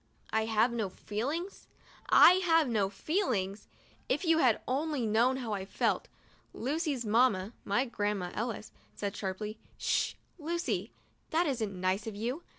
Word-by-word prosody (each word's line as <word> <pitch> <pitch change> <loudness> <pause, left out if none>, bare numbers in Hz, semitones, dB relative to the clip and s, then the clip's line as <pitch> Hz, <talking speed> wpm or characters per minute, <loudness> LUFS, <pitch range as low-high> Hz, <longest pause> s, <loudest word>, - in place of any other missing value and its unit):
1 220 0 +1
have 225 +2 +3
no 225 -4 -1
feelings? 280 - -4 0.4
I 365 +1 +8
have 325 -4 +4
no 210 -5 +1
feelings? 205 - -1 0.4
If - - 0
you 325 -1 +4
had 250 -7 +4
only 280 -1 0
known 235 +5 +3
how 235 -5 -3
I 195 -2 -2
felt! 195 - 0 0.5
Lucy's 280 -1 -1
mamma 215 -2 +2
(my 240 +7 +1
Grandma 205 -6 -2
Ellis) 225 -1 -4 0.2
said, 200 -1 -3
sharply, 210 +3 -4
" - - -32
'Sh! - - 0 0.2
Lucy, 340 +3 -2 0.4
that 330 +3 +2
isn't 220 - -2
nice 185 +4 0
of 220 - -5
you. 240 +9 -3
230 Hz, 150 wpm, -31 LUFS, 205-290 Hz, 0.5 s, I